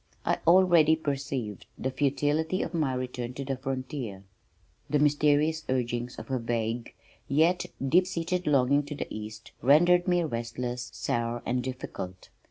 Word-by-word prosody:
I - - +1
already 170 -3 +6
perceived 140 - -4
the 130 - -2
futility 150 +6 0
of - - -5
my 150 -6 0
return 125 -1 -4
to 140 - -5
the 135 0 -1
frontier. 130 -6 -5 0.7
The 150 - +3
mysterious 150 +2 +3
urgings 120 -1 -1
of - - -8
a 130 - +1
vague 115 0 -2 0.3
yet 160 +6 +2 0.2
deep 180 +6 +4
seated 180 0 -2
longing 140 0 +4
to 150 - -5
go - - -3
east 110 +1 -8
rendered 175 +7 +5
me 175 -1 +3
restless, 120 -1 -4
sour 120 0 -2
and 125 +1 0
difficult. 95 -8 -6
135 Hz, 145 wpm, -28 LUFS, 120-155 Hz, 0.7 s, already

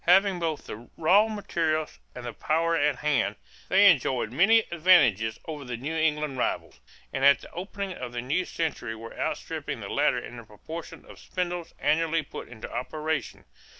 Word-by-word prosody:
Having 190 +1 +5
both 160 -3 -2
the 115 +3 -9
raw 190 +7 +5
materials 165 -7 -2 0.2
and 125 -1 -7
the 120 - -5
power 165 +6 +1
at 145 -2 +2
hand, 145 -1 0 0.3
they 195 +2 +6
enjoyed 130 - +3
many 205 - +5
advantages 135 - +4
over 150 -3 -6
the 125 -2 -5
New 145 +7 -4
England 150 -4 0
rivals, - - -2 0.3
and 135 - -2
at 140 0 +6
the - - -13
opening 195 +2 -5
of 125 -7 -6
the 120 - -4
new 145 +9 0
century 140 -8 -3
were 115 +1 -10
outstripping - - -3
the - - -7
latter - - +2
in 120 - -7
the 115 - -9
proportion 155 +10 -9
of - - -13
spindles 175 -2 -4
annually 160 +2 +2
put - - -8
into 115 -2 -9
operation. 155 +5 -3
155 Hz, 175 wpm, -27 LUFS, 125-175 Hz, 0.3 s, they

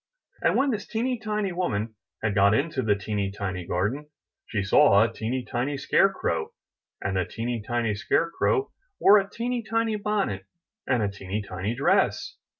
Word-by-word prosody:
And - - +2
when 275 0 +3
this 210 -3 -4
teeny 240 +2 -1
tiny 210 -2 -2
woman 115 - -2 0.3
had 110 -2 +1
got 100 +1 +4
into 140 +1 0
the 105 -4 +2
teeny 100 0 -2
tiny 95 -3 -5
garden, 105 +12 -1 0.4
she 105 -3 -1
saw 100 +1 +6
a 115 0 -1
teeny 120 +3 -3
tiny 135 +4 -2
scare 195 +7 +3
crow, 80 - -2 0.5
and 95 0 -1
the 90 - +1
teeny 115 +5 -3
tiny 115 0 -1
scare 165 +10 0
crow 415 - +1 0.3
wore 205 +1 +7
a 195 0 -4
teeny 240 +3 -2
tiny 225 0 0
bonnet 200 - -1 0.4
and 125 -4 +2
a - - +2
teeny 100 +1 -4
tiny 100 +3 -3
dress. 140 - +1
120 Hz, 170 wpm, -26 LUFS, -, 0.5 s, wore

